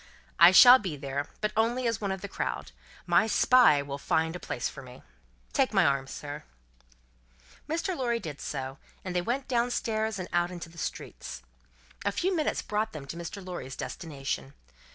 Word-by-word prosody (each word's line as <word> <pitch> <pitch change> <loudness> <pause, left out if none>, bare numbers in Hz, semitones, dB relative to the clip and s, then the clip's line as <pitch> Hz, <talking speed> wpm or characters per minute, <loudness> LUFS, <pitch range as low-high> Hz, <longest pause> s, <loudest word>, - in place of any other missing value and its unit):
"I 170 +2 +10
shall 245 +6 +10
be 180 -9 -4
there, 140 +1 -3
but 210 0 0
only 235 +3 +1
as 230 -2 0
one 200 -2 -1
of 190 -1 -4
the 200 - -5
crowd. 125 - -4 0.3
My 175 +5 +4
Spy 225 - +5
will 140 0 -6
find 160 +3 0
a - - -5
place 120 - -3
for 140 - -9
me. 125 -1 -13 0.5
Take - - +1
my - - +5
arm, 140 -1 +1
sir." 145 +2 -7 1.3
Mr. 335 +3 -1
Lorry 240 -5 0
did 150 -8 -7
so, 135 -1 -5 0.3
and 180 -1 -4
they 180 - +2
went 245 +8 -2
down 240 -1 +1
stairs 220 -3 -1
and 185 -1 -5
out 175 0 +2
in 180 - -7
the 170 -1 -10
streets. - - -6 0.6
A 200 - +1
few 370 - 0
minutes 310 -3 0
brought 215 +1 -2
them 150 -3 -7
to 140 - -7
Mr. 170 +3 -7
Lorry's 175 -7 -6
destination. 140 -4 -5
180 Hz, 185 wpm, -28 LUFS, 145-225 Hz, 1.3 s, I